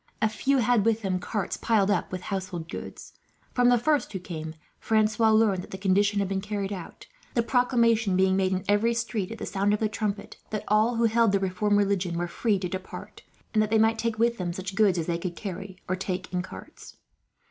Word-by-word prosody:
A 220 - +3
few 270 +6 +1
had 240 -3 +3
with 225 0 +1
them 185 -2 0
carts, 205 +1 -3
piled 210 -3 +2
up 185 - 0
with 185 -1 -4
household 185 -4 -4
goods. - - -8 0.4
From 245 -1 +4
the 245 - +5
first 295 +4 +1
who 195 - -3
came, 160 -3 -7 0.2
Francois 220 0 +2
learned 215 -4 +3
that - - -11
the 190 - -6
conditions 200 +2 +2
had 195 - -1
been 190 0 -2
carried 205 -1 -3
out; 180 -4 -9 0.3
the 235 - +3
proclamation 235 -5 +2
being 190 0 +3
made 190 -1 +1
in 185 -1 -2
every 210 +3 +2
street, 230 -4 -2
at 225 - -7
the - - -5
sound 200 +1 +1
of - - -5
the 220 - +1
trumpet, 210 -1 -4
that 215 -1 -3
all 215 +3 +3
who 230 - +1
held 230 -2 +3
the 200 - +3
reformed 200 +2 +1
religion 195 -4 +1
were 175 0 -1
free 210 +4 0
to 185 -1 -3
depart, 185 +1 -8 0.3
and 215 - +4
that 215 - 0
they 220 - +3
might 225 +1 +3
take 230 -1 -1
with 235 0 +1
them 175 -2 -2
such 190 +2 -5
goods 195 -3 +3
as 165 - -1
they 170 0 -1
could 175 0 -4
carry, 195 -1 -7
or 185 - 0
take 185 0 -4
in 180 - 0
carts. 185 - -11
205 Hz, 225 wpm, -27 LUFS, 185-225 Hz, 0.4 s, the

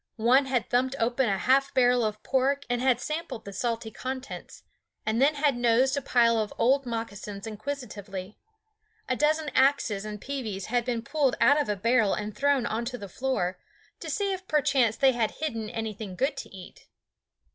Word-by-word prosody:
One 250 +5 +4
had 250 -3 0
thumped 255 +2 +1
open 240 +1 +1
a 195 - +1
half 270 +7 +2
barrel 245 -1 +4
of 215 -1 -3
pork 275 +2 +1
and 245 0 0 0.2
sampled 305 -5 -5
the 200 - -7
salty 230 +1 -2
contents, 260 +3 -7 0.4
and 220 +3 0
then 295 +3 +4
had 285 -2 +2
nosed 245 +3 +3
a 280 - -1
pile 235 -3 +3
of 215 -1 -2
old 270 +2 +2
moccasins 210 -3 -5
inquisitively. 210 -5 -6 0.7
A 255 - 0
dozen 305 +2 +1
axes 260 -8 +2
and 210 -1 -6
peaveys 220 -7 -4
had 240 -1 +2
been 235 -2 -2
pulled 280 -1 +1
out 290 +1 +5
of 285 - -4
a 210 - +1
barrel 225 +1 +2
and 210 0 -5
thrown 280 -3 +2
on 230 +1 -2
the 240 -5 -5
floor, 190 -5 -2 0.4
to - - -6
see 400 -1 0
if 375 0 -7
perchance 275 -7 +2
they 270 -1 +5
had 235 -3 -1
hidden 230 -9 -3
anything 215 -4 -5
good 270 +7 0
to - - -7
eat. 185 -2 -13
245 Hz, 180 wpm, -27 LUFS, 215-275 Hz, 0.7 s, out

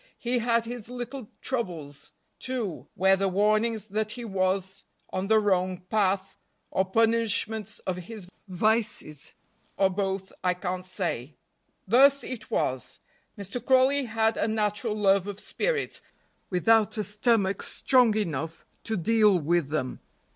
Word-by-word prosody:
He 245 +1 0
had 230 0 +1
his 235 -1 -6
little 250 -1 -6
troubles, 170 - -4 0.3
too, 240 -9 -4
whether 190 +1 +3
warnings 215 +3 +1
that 215 +1 -2
he 240 -1 -7
was 190 -1 -1 0.3
on 185 +1 -2
the 220 +1 +5
wrong 185 -3 +1
path, 195 -2 +1 0.4
or 190 - +1
punishments 220 0 +1
of 185 -1 -2
his 185 +1 -9 0.2
vices, 210 -6 -1 0.4
or 195 -1 +3
both, 190 0 -2
I 180 -1 +2
can't 180 0 -4
say. 160 - -3 0.5
Thus 275 +6 +6
it 230 -4 -7
was. 130 -2 -2 0.4
Mr. 200 +4 -5
Crawley 265 +2 +4
had 225 -1 +1
a - - +1
natural 210 0 -1
love 195 -2 +3
of 205 0 -5
spirits, - - -2 0.5
without 220 +4 +3
a 215 - 0
stomach 210 -2 +1
strong 245 -5 +3
enough 165 -5 -3 0.2
to 220 -1 -1
deal 210 +1 +4
with 170 -2 +1
them. 145 -4 -2
210 Hz, 135 wpm, -27 LUFS, 185-225 Hz, 0.5 s, Thus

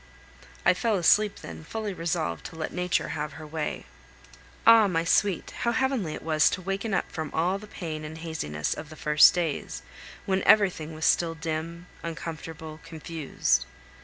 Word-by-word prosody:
I - - +6
fell 220 +3 0
asleep 205 +3 +3
then, - - -9
fully 215 +3 -4
resolved 165 - -2
to - - -13
let 160 -1 -4
nature 180 0 0
have 150 -1 -4
her 155 - -9
way. 155 0 -4 0.8
Ah! 225 -2 +8
my 165 -3 0
sweet, 190 +1 +1
how 235 - +1
heavenly 255 - 0
it - - -9
was 155 -1 +4
to 185 - -3
waken 195 +4 -2
up - - -1
from 160 -2 -4
all 180 +5 +1
the 215 - -11
pain 160 -6 -6
and 155 +1 -7
haziness 155 - -3
of 150 - -8
the 155 - -10
first 150 +2 +6
days, 165 -5 -2 0.4
when 190 0 +1
everything 180 -8 +3
was 160 +1 -2
still 165 -1 +3
dim, 165 +2 -4 0.2
uncomfortable, 160 -1 -7
confused. 155 - -1
165 Hz, 165 wpm, -27 LUFS, 155-190 Hz, 0.8 s, Ah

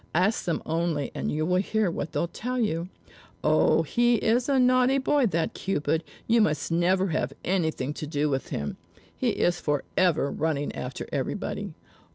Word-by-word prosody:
Ask 190 +6 +2
them 170 - -1
only 160 -3 -1
and - - -2
you 155 +1 0
will 180 +2 +2
hear 215 -2 0
what 165 - -4
they'll 170 - 0
tell 250 +8 -4
you. 175 -6 -1 0.5
Oh, - - +4
he 240 0 +2
is 235 +4 +1
a 275 - +3
naughty 255 +1 +4
boy, 275 -1 +2
that 170 -4 -1
Cupid; 160 -3 -1 0.2
you 230 0 +4
must 155 -5 0
never 185 +3 +2
have 140 -4 -1
anything 160 -7 0
to 150 - -6
do 150 0 0
with 135 -2 -2
him. 70 0 -4 0.4
He - - 0
is 175 0 +1
forever 150 +1 +1
running 150 -2 -1
after 125 0 -5
everybody. - - -3
170 Hz, 170 wpm, -26 LUFS, 155-220 Hz, 0.5 s, Oh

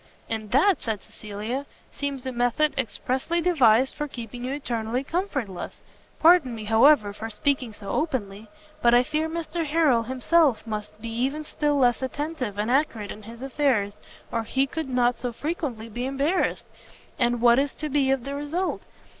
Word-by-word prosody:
"And 220 -2 -4
that," 310 - +3
said 220 -3 -3
Cecilia, 215 +7 -5 0.2
"seems 280 -2 -4
a 260 - -2
method 245 +5 +1
expressly 260 +6 -1
devised 265 -8 +4
for 295 - -3
keeping 240 -2 -8
you 255 - -2
eternally 245 -3 -2
comfortless: 275 - -3 0.4
pardon 320 -7 +5
me, 220 - -6
however, 225 0 +5
for 220 +2 -6
speaking 255 +2 0
so 205 -1 -10
openly, 215 -8 -2 0.3
but 240 0 +5
I 245 - +6
fear 305 +4 -1
Mr 335 0 -3
Harrel 300 -6 +3
himself 260 +3 +2
must 210 -1 -6
be 230 +1 -6
even 265 +7 -1
still 295 -1 0
less 245 -3 +3
attentive 265 -5 -3
and 215 +3 0
accurate 245 -7 0
in 215 - -9
his 230 +4 -10
affairs, 255 -7 0 0.3
or 230 - 0
he 265 +5 +1
could 310 +1 -5
not 245 -1 +2
so 245 -1 -3
frequently 275 -4 -4
be 240 +3 -4
embarrassed. 280 +7 0 0.5
And 240 -1 +2
what 240 +1 +5
is 280 0 -1
to 305 - -4
be 280 -2 +2
the 270 +2 -6
result? 295 +6 -2
255 Hz, 165 wpm, -25 LUFS, 225-295 Hz, 0.5 s, I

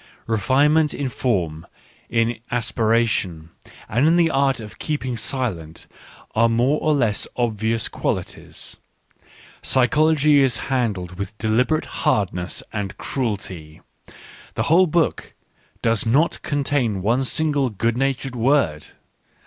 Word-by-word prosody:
Re 115 -1 0
finement 150 +6 +3
in 140 -2 -2
form, 85 -11 -2 0.4
in 115 0 0
aspiration, 110 -8 0 0.4
and 125 +8 +2
in 165 - +4
the 170 -2 +3
art 135 -2 +2
of 105 -2 -10
keeping 140 -5 -3
silent, 105 - -3 0.5
are 115 +1 +3
its 115 - 0
more 130 +6 +2
or 155 -1 +2
less 115 -7 +1
obvious 115 -1 0
quali - - -1
ties; - - -8 0.8
psychology 150 +2 +3
is 130 -4 +3 0.2
handled 100 -8 -2
with 100 +2 -5
deliberate 125 +9 +1
hard 105 - 0
ness 90 0 -4
and 100 -3 -4
cruelty, 95 - -4 0.4
— - - -19
the - - 0
whole 180 +4 +4
book 165 0 0 0.5
does 115 -2 +2
not 140 +9 +2
con 145 -1 -1
tain 120 -10 0
one 120 +6 +2
single 145 -1 +1
good 115 +2 -1
natured 135 0 -1
word. 115 - +1
120 Hz, 135 wpm, -22 LUFS, 105-140 Hz, 0.8 s, in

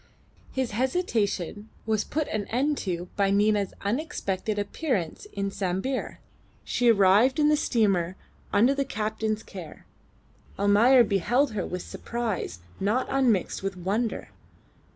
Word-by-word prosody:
His 260 -3 -2
hesitation 220 - -1 0.2
was 215 -1 +1
put 310 -1 -2
an 210 -2 -2
end 280 +5 0
to 180 -2 -3
by 200 -1 +2
Nina's 205 0 +2
unexpected 210 - -2
appearance 205 - -2
in 200 0 -2
Sambir. 195 +8 -2 0.5
She 245 -1 +2
arrived 210 +5 +5
in 300 -1 +4
the 300 - +5
steamer 195 - +1 0.4
under 235 +7 +4
the 280 0 0
captain's 215 -1 -2
care. 180 -6 -10 0.7
Almayer 220 +6 +6
beheld 235 +7 +1
her 205 -4 -3
with 180 0 -4
surprise 225 - -4 0.2
not 215 +7 +1
unmixed 245 -9 +1
with 195 -1 -3
wonder. 205 +6 -2
215 Hz, 125 wpm, -26 LUFS, 195-250 Hz, 0.7 s, Almayer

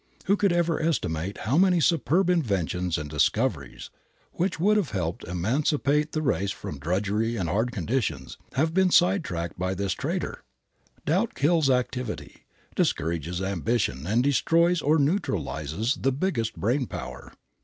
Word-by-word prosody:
Who 200 - +4
could 200 -2 +2
ever 170 -2 +1
estimate 95 - -1
how 135 +9 +2
many 185 -2 +4
superb 170 +2 +2
inventions 90 - 0
and 75 -1 -5
discoveries, 75 0 -1 0.4
which 175 -1 -2
would 205 +5 +4
have 205 -8 +1
helped 85 -4 -3
emancipate 140 - 0
the 155 - -1
race 100 -8 0
from 75 -7 -6
drudgery 100 +8 0
and 95 -6 -2
hard 110 +9 0
conditions, 85 - -2 0.2
have 160 +4 +1
been 190 0 +4
side 180 +1 +4
tracked 85 - -5
by 95 +1 -1
this 100 -1 -1
traitor! - - -3 0.6
Doubt 190 +9 +1
kills 155 0 +3
activity, 125 -2 -2 0.3
discourages 85 +3 -1
ambition 95 - -1
and 115 +5 +2
destroys 165 +5 +3
or 150 +3 +3
neutralizes 115 - -1
the 135 - +2
biggest 130 - -1
brain 125 +5 0
power. 65 0 -8
120 Hz, 145 wpm, -26 LUFS, -, 0.6 s, Who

